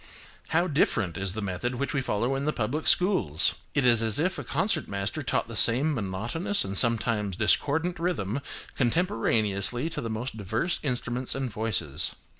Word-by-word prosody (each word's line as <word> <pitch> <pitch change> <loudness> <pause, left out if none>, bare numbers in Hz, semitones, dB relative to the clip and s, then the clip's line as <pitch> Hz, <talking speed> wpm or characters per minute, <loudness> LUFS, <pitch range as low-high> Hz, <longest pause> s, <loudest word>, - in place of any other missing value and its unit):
How 170 +2 +1
different 110 - 0
is 95 -1 -1
the 110 - -4
method 100 +6 -3
which 140 +5 -3
we 145 - 0
follow 120 +1 -1
in 135 +1 -2
the 150 - 0
public 130 +8 -2
schools! 110 - +2 0.2
It 140 - +2
is 120 -2 +4
as 110 -2 +1
if 180 +5 0
a - - -5
concert 190 +10 -1
master 100 0 -3
taught - - -1
the - - -8
same 135 +7 +6
monotonous 115 - -1
and 95 0 -5
sometimes 110 -3 +1
discordant 160 +10 +1
rhythm 140 - -2 0.4
contemporaneously 120 - +1
to - - -4
the 115 - -4
most 110 +2 -5
diverse 110 - -1
instruments 125 -2 -1
and 135 -3 -3
voices. 105 -10 -1
120 Hz, 170 wpm, -27 LUFS, 105-145 Hz, 0.4 s, same